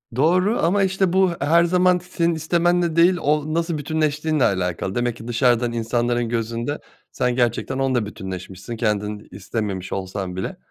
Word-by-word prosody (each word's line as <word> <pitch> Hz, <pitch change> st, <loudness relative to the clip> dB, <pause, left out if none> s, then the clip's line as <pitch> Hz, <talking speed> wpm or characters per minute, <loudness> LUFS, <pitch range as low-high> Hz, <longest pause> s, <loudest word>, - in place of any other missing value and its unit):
Doğru 180 Hz, -, +2 dB
ama 195 Hz, +4 st, +3 dB
işte 190 Hz, -1 st, +1 dB
bu 190 Hz, -1 st, +4 dB
her 165 Hz, +4 st, +4 dB
zaman 180 Hz, +1 st, +3 dB
senin 170 Hz, -2 st, -1 dB
istemenle 170 Hz, +1 st, +1 dB
değil 175 Hz, +2 st, +5 dB
o 150 Hz, +1 st, 0 dB
nasıl 165 Hz, 0 st, -1 dB
bütünleştiğinle 155 Hz, -1 st, 0 dB
alakalı. 95 Hz, -1 st, -1 dB
Demek 120 Hz, -1 st, -1 dB
ki 115 Hz, -, -10 dB
dışarıdan 120 Hz, 0 st, +2 dB
insanların 120 Hz, +1 st, -1 dB
gözünde 115 Hz, +4 st, -2 dB, 0.3 s
sen 125 Hz, -1 st, 0 dB
gerçekten 125 Hz, +2 st, 0 dB
onunla 130 Hz, -5 st, +1 dB
bütünleşmişsin 95 Hz, +2 st, -7 dB
kendin 105 Hz, -2 st, -2 dB
istememiş 100 Hz, -1 st, -4 dB
olsan 95 Hz, -1 st, -4 dB
bile. 95 Hz, -, -4 dB
125 Hz, 145 wpm, -22 LUFS, 110-170 Hz, 0.3 s, değil